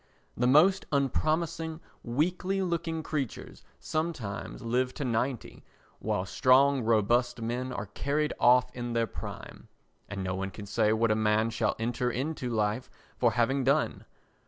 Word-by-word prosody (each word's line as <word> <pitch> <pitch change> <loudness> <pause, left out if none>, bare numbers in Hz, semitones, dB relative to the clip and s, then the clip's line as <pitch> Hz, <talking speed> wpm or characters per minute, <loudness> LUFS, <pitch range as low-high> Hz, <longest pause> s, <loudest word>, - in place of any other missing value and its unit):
The 125 - +1
most 170 +9 +5
unpromising 160 +3 0 0.2
weakly 180 +9 0
looking 165 -2 -2
creatures 145 -5 -4 0.2
sometimes 155 -14 -4
live 125 +2 0
to 145 - -3
ninety 120 +1 -2 0.4
while 90 - -1
strong 130 +7 +4
robust 120 +2 +2
men 120 +3 -3
are 105 -4 -4
carried 145 +8 -1
off 125 +1 +5
in 120 -1 -4
their 115 0 +2
prime. - - -9 0.4
And 100 -1 -4
no 95 0 -2
one 95 +1 -3
can 100 +1 -9
say 105 +1 +1
what 110 0 +2
a - - +3
man 110 +1 +2
shall 110 -1 0
enter 120 +2 -1
into 130 +1 -3
life 110 +1 -1 0.3
for - - +3
having 130 +3 +1
done. 140 +4 +1
125 Hz, 145 wpm, -29 LUFS, 115-150 Hz, 0.4 s, most